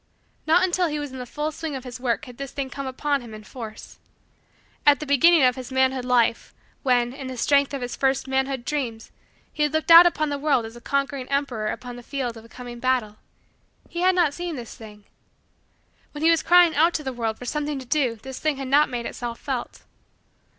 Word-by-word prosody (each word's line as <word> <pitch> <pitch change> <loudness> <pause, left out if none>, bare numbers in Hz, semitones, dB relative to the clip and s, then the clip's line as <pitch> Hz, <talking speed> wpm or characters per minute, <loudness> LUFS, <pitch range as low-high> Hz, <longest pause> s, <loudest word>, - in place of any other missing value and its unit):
Not 340 +4 +5
until 365 -1 +2
he 300 -1 -3
was 290 -2 -5
in 260 - -8
the 250 - -6
full 300 +4 -3
swing 310 -1 -5
of 260 - -6
his 250 -1 -8
work 245 -2 -1
had 250 -2 -12
this 275 -1 -5
thing 270 -2 -4
come 275 +1 -5
upon 280 +2 -1
him 230 -3 -10
in 215 - -11
force. 220 -1 -10 0.8
At 290 -2 +5
the 305 - -5
beginning 300 +3 +5
of 250 -1 +4
his 260 0 -8
manhood 260 -1 +1
life, 240 -2 +1 0.3
when, 245 -2 +2
in 270 -1 -7
the 260 -1 -6
strength 280 +3 +3
of 275 -3 -4
his 245 - -4
first 270 -1 0
manhood 265 -1 -1
dreams 240 -7 -3 0.4
he 300 - -4
had 295 0 +2
looked 315 +2 +1
out 340 +1 +11
upon 310 -3 0
the 285 -1 -3
world 280 -5 +1
as 225 +1 -10
a 240 - -12
conquering 275 -1 -2
emperor 275 -6 -1
upon 245 +2 -5
the - - -9
field 250 -2 -4
of 225 - -11
a 230 - -16
coming 245 -1 -9
battle, 245 -4 0 0.7
he 345 - -5
had 370 +1 +3
not 335 -5 +3
seen 345 0 -4
this 240 -4 -8
thing. 210 -2 -13 1.1
When 295 +1 -6
he 330 - +6
was 330 - +3
crying 350 -2 +5
out 330 +4 +3
to 305 - -2
the 265 -2 -4
world 225 -2 -2
for 245 - -9
something 295 +2 -2
to 260 - -7
do 255 -3 +1
this 265 +4 -9
thing 305 -3 0
had 270 -1 -5
not 290 +2 +4
made 240 -2 -4
itself 235 -1 -5
felt. 260 -4 -5
265 Hz, 225 wpm, -24 LUFS, 245-295 Hz, 1.1 s, out